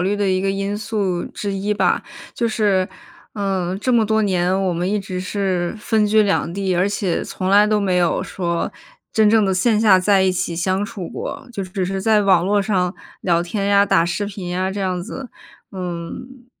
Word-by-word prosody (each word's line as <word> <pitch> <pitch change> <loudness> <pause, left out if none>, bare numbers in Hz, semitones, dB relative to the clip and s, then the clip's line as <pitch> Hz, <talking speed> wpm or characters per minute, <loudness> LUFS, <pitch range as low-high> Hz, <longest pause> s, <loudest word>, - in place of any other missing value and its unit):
虑 195 +3 +1
的 205 -1 0
一 185 0 +1
个 195 +1 0
因 195 +1 -2
素 205 -5 -2
之 200 -1 -5
一 200 +2 -1
吧。 - - +1 0.3
就 235 - 0
是， 205 -4 +1 0.5
呃， 190 -3 -1
这 255 +4 0
么 225 -3 +3
多 220 0 +2
年， 185 -2 +1
我 185 - +1
们 175 +2 -1
一 210 - +1
直 185 -2 -5
是 185 -2 -1
分 215 0 +1
居 215 +1 +4
两 200 -4 0
地， 195 -2 -1
而 180 +3 +2
且 200 -4 -1
从 185 0 -3
来 205 +1 +6
都 210 0 +2
没 190 -2 +1
有 175 -1 +1
说 170 -2 -3 0.4
真 215 -1 +4
正 220 -1 +4
的 190 - +1
线 210 +4 +2
下 205 -4 +6
在 195 +1 +3
一 190 -1 +2
起 175 -2 -2
相 185 +3 0
处 205 -5 -6
过， - - -6
就 200 - -4
只 185 0 -3
是 195 +1 -2
在 215 +1 +3
网 185 -3 +4
络 205 +1 +2
上 190 -3 0 0.3
聊 170 -2 +2
天 195 +3 -3
呀、 200 0 +5
打 165 - +3
视 175 +4 -2
频 195 -3 -6
呀， 185 +1 -1
这 200 +1 -4
样 185 -2 -1
子。 255 +6 -7 0.4
嗯， 185 +8 -7
195 Hz, 225 characters per minute, -20 LUFS, 185-210 Hz, 0.5 s, 来